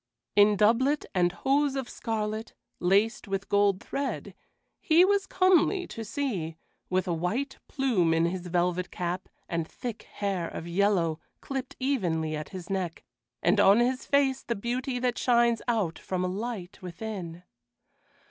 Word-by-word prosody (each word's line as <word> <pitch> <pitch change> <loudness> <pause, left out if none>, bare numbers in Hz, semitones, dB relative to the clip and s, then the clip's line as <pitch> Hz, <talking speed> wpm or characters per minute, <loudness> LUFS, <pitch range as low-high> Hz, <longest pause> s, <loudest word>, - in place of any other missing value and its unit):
In 205 0 +6
doublet 250 +8 +3
and 175 -2 +3
hose 275 +8 +1
of 265 -3 -2
scarlet, 220 -1 -3 0.2
laced 200 +6 +2
with 195 0 -3
gold 200 -1 +3
thread, 280 0 -3 0.5
he 335 +2 +5
was 400 0 +2
comely 370 0 +3
to 225 - -6
see, 205 - -3 0.3
with 185 +1 0
a 175 - +1
white 225 - -2
plume 235 - +1
in 165 +1 +3
his 180 +1 -3
velvet 175 +1 0
cap, 180 +1 -4 0.2
and 165 -1 -2
thick 235 -3 -6
hair 195 -4 -1
of 165 - -7
yellow, 175 -3 +2 0.2
clipped 265 -2 -5
evenly 175 - 0
at 150 0 -5
his 185 -2 -8
neck, 185 -4 -3 0.4
and - - +4
on 200 +3 +6
his 255 +2 0
face 275 -2 +2
the 235 - -2
beauty 245 +4 -2
that 245 -1 0
shines 235 -2 +3
out 210 -9 0
from 185 -1 -2
a - - +1
light 195 -1 -5
within. 180 -2 -6
205 Hz, 150 wpm, -28 LUFS, 180-255 Hz, 0.5 s, In